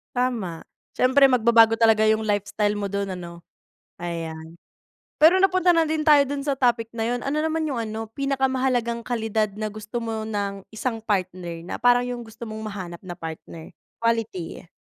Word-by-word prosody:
Tama. 230 -10 -1 0.3
Siyempre 260 +2 +3
magbabago 230 -2 +5
talaga 225 -1 +5
yung 220 0 +2
lifestyle 205 0 0
mo 200 -1 -3
dun 200 -2 -2
ano. 170 -1 -9 0.6
Ayan. 165 -1 -6 0.7
Pero 345 +4 +7
napunta 370 -2 +4
na 330 -2 +4
din 310 0 -1
tayo 300 -2 +6
dun 280 0 -3
sa 275 -2 -1
topic 235 -3 +1
na 225 -1 -3
yun 245 - -4
ano 280 +2 -1
naman 320 +1 0
yung 280 -5 -2
ano 220 0 -5
pinakamahalagang 260 -3 0
kalidad 220 -3 -1
na 215 0 -3
gusto 215 +3 -6
mo 220 -1 -3
ng 200 -2 -3
isang 225 +1 -2
partner 180 -5 -3
na - - -6
parang 245 0 +4
yung 245 -1 -4
gusto 220 +2 -15
mong 220 -1 -7
mahanap 185 -5 -7
na 175 - -5
partner, 165 -1 -9 0.3
quality 225 -7 -1
yeah. - - -19
225 Hz, 170 wpm, -24 LUFS, 200-255 Hz, 0.7 s, Pero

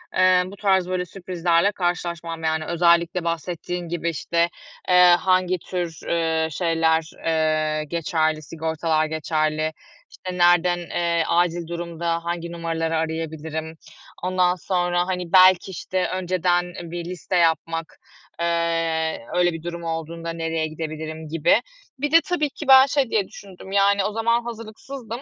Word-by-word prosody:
eee, 185 0 +5
bu 190 +2 -9
tarz 190 -3 +2
böyle 180 -1 -1
sürprizlerle 175 0 0
karşılaşmam. 170 -3 -3
Yani, 160 0 0
özellikle 170 +1 +2
bahsettiğin 170 +1 -3
gibi, 170 0 -2
işte, 170 +2 0 0.4
eee, 180 -1 +7
hangi 185 -1 +2
tür, 175 -3 -4
eee, 160 -1 +1
şeyler, 165 -1 +1
eee, 155 -1 +1
geçerli, 155 -1 -1
sigortalar 160 +1 -1
geçerli? 155 0 -1 0.4
İşte, 180 -1 -7
nerden, 175 0 +4
eee, 170 -1 0
acil 175 0 +1
durumda 170 0 -3
hangi 170 0 -3
numaraları 165 -1 -2
arayabilirim? 160 0 -4 0.5
Ondan 180 -1 +2
sonra, 175 0 0
hani, 180 -2 -3
belki, 185 0 +6
işte, 185 0 -2
önceden 180 -1 0 0.2
bir 175 -1 -5
liste 180 +1 -4
yapmak, 165 -1 0 0.4
eee, 165 -1 0 0.2
öyle 175 -1 +3
bir 165 -1 -7
durum 170 0 -5
olduğunda 165 0 -4
nereye 165 -1 -2
gidebilirim 155 0 -6
gibi. 160 -1 +3 0.4
Bir 295 +1 -1
de 330 0 +7
tabii 325 -5 0
ki 300 - -9
ben, 265 0 +9
şey 275 -3 0
diye 205 -4 +1
düşündüm, 190 -1 -12
yani, 200 0 +3
o 210 - -1
zaman 230 +2 +1
hazırlıksızdım, 230 +2 -8
170 Hz, 135 wpm, -23 LUFS, 160-185 Hz, 0.5 s, ben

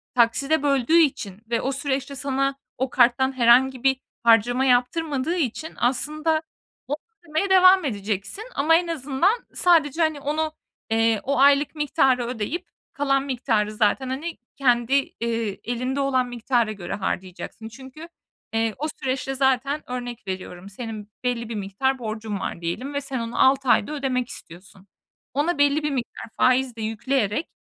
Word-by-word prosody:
takside 270 +6 +2
böldüğü 280 +2 +3
için 225 - +1
ve 230 -1 0
o 270 - -1
süreçte 275 0 -2
sana 275 0 0 0.2
o 260 +1 -1
karttan 260 +2 +3
herhangi 250 +2 +4
bir 265 -1 +3 0.3
harcama 235 +3 +4
yaptırmadığı 270 +4 +1
için 315 0 -3
aslında 305 +6 0 0.5
o 290 - -1 0.3
ödemeye 330 +5 -1
devam 370 -1 +6
edeceksin. 205 - -3
Ama 310 +4 +4
en 345 +1 +2
azından 300 - +1 0.2
sadece, 330 -3 +3
hani, 315 -2 +1
onu, 310 +2 -2 0.4
eee, 225 -1 +2
o 280 +2 0
aylık 280 +2 +4
miktarı 265 -4 +2
ödeyip 250 - -4 0.3
kalan 275 -2 +1
miktarı 235 -6 0
zaten, 215 +5 +1
hani, 300 +6 -4 0.2
kendi, 245 -1 +2 0.3
eee, 230 -3 -2
elinde 250 +3 -2
olan 260 -2 +1
miktara 240 -1 0
göre 195 -5 -6
harcayacaksın. 190 +3 -5
Çünkü, 265 +7 -11 0.5
eee, 225 -1 +1
o 300 +4 -2
süreçte 270 0 -2
zaten 265 +2 0
örnek 245 -3 -6
veriyorum 185 0 -6
senin 215 0 -7
belli 235 -2 -2
bir 230 - -4
miktar 210 +7 -1
borcun 215 -2 -4
var 175 - -5
diyelim 245 +12 -4
ve 285 - -1
sen 270 -2 -4
onu 230 0 -4
6 265 0 +3
ayda 225 - +3
ödemek 260 -4 -1
istiyorsun. 185 +3 -13 0.5
Ona 295 +5 0
belli 285 +1 +3
bir 300 - 0
miktar 250 -4 -4
faiz 255 -1 +3
de 225 - -7
yükleyerek, 225 +4 -1
260 Hz, 150 wpm, -24 LUFS, 230-285 Hz, 0.5 s, devam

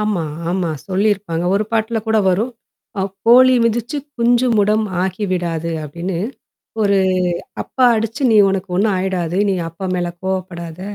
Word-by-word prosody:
ஆமா, 210 -5 0 0.3
ஆமா 180 -1 -1 0.2
சொல்லியிருப்பாங்க. 190 -3 0
ஒரு 205 +2 +1
பாட்ல 225 0 0
கூட 220 0 +2
வரும். 210 +7 0 0.5
அ - - +1 0.2
கோழி 255 +2 +7
மிதிச்சு 235 +5 -1 0.2
குஞ்சு 240 +1 +3
முடம் 210 +2 +2 0.2
ஆகிவிடாது 180 -4 -2
அப்பாடின்னு 170 +4 -4 0.6
ஒரு 200 -1 +3 0.6
அப்பா 260 - 0
அடிச்சு 225 +5 -3
நீ 220 - +4
உனக்கு 190 -1 -2
ஒண்ணும் 205 +1 +2
ஆயிடாது. 185 -2 -1
நீ - - +1
அப்பா 165 +4 -9
மேல 175 -1 -1
கோவப்படாத. 180 -3 -4
195 Hz, 135 wpm, -18 LUFS, 180-220 Hz, 0.6 s, கோழி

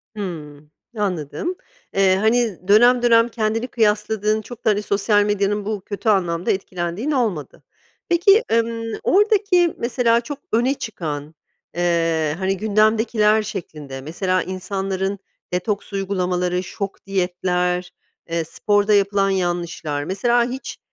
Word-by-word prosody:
Hımm. 150 -7 -7 0.3
Anladım. 195 - -2 0.4
Eee, 195 -1 +4
hani, 220 -3 +1
dönem 240 +4 +6
dönem 230 -1 +5
kendini 225 +1 -1
kıyasladığın, 215 -1 +1
çok 240 +2 -12
da, - - +5
hani, 210 -1 +2
sosyal 205 0 +2
medyanın 205 0 0
bu 210 -2 -3
kötü 205 +3 -3
anlamda 175 -4 +1
etkilendiğin 185 - -3
olmadı. 220 - -2 0.5
Peki, 395 +6 +5
emm, 230 0 0 0.2
oradaki 405 -4 +3
mesela 235 -1 +2
çok 285 +4 -7
öne 240 +4 +2
çıkan, 155 - -6 0.4
eee, 165 -3 +1
hani, 190 +1 -1
gündemdekiler 215 +1 +3
şeklinde 150 -9 -7
mesela 185 +5 -1
insanların 190 +1 -3 0.3
detoks 200 +3 -2
uygulamaları, 180 -2 -1
şok 195 +1 -6
diyetler, 180 -1 -1 0.4
eee, 165 0 -1
sporda 205 +5 +1
yapılan 200 -1 +3
yanlışlar. 175 -5 -2
Mesela 235 +8 +1
hiç, 260 +2 -6
200 Hz, 120 wpm, -21 LUFS, 180-225 Hz, 0.5 s, dönem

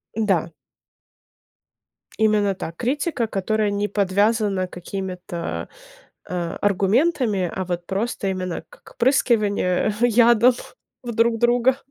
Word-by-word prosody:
Да. 190 -7 +1 1.7
Именно 210 -2 +3
та 165 - -6
критика, 265 - -1
которая 210 +1 0
не 205 +1 -1
подвязана 200 -1 +1
какими-то, 180 -1 -6 0.9
а, 175 -2 -3
аргументами, 205 - +1
а 190 - -2
вот 175 -1 -4
просто, 200 +2 -2
именно 185 -2 -3
как - - -18
прыскивание 215 -7 +2
ядом 240 +1 +5 0.5
в 240 - -4
друг 230 0 +2
друга. 245 +2 +3
210 Hz, 100 wpm, -22 LUFS, 185-235 Hz, 1.7 s, ядом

